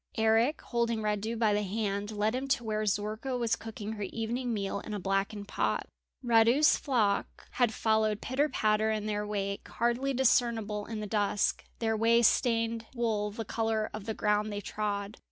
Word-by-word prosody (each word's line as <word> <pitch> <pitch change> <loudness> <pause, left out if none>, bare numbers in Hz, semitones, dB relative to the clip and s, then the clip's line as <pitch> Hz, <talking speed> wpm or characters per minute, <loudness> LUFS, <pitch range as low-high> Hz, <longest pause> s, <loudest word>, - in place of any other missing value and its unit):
Eric 225 +6 +3
holding 235 -2 -1
Radu 210 +2 -1
by 220 -2 +3
the 205 - +1
hand 205 0 -2
led 215 +1 0
him 260 +2 -2
to 270 -3 +1
where 215 -1 -1
Zorka 215 +6 -1
was 235 -2 +1
cooking 220 -1 -7
her 215 -1 -6
evening 230 +5 -2
meal 200 -2 -2
in 210 +1 -6
a - - -3
blackened 195 +2 -1
pot. - - -1 0.4
Radu's 235 +5 +5
flock 220 -8 0
had 245 -4 +2
followed 220 -1 +1
pitter 275 +6 0
patter 215 -3 +2
in 215 -1 -1
their 210 -1 -2
wake, 200 -1 -3
hardly 240 +3 0
discernible 230 -5 +1
in 220 -2 -4
the - - -3
dusk, 205 -1 0
their 225 -1 0
way 230 +2 +4
stained 230 -1 +2
wool 220 -3 0
the 220 +2 -6
colour 220 0 -1
of 215 -2 -6
the 220 - -3
ground 210 0 +1
they 205 - -3
trod. 205 0 -3
220 Hz, 175 wpm, -30 LUFS, 210-230 Hz, 0.4 s, Radu's